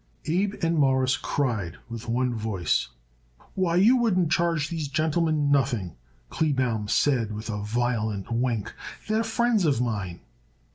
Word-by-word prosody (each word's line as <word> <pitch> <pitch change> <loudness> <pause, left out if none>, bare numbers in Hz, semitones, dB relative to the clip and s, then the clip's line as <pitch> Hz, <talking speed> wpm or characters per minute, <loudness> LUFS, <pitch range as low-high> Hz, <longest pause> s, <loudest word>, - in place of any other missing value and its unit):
Abe 190 +5 0
and 165 -1 +2
Morris 130 -2 +3
cried 115 - -2
with 115 0 -7
one 125 +1 +1
voice. 105 - -1 0.7
"Why, 180 -3 0
you 210 +8 +6
wouldn't 185 -9 +2
charge 165 -3 +1
these 160 -3 -3
gentlemen 155 0 +1
nothing," 120 - +1 0.4
Kleebaum 130 -8 0
said 120 -2 +2
with 110 +2 -5
a 105 -1 -3
violent 110 -2 -1
wink. 115 -3 -1 0.3
"They're 220 +1 +1
friends 225 -2 +1
of 145 -7 +2
mine." 105 -8 -3
130 Hz, 135 wpm, -26 LUFS, 110-165 Hz, 0.7 s, you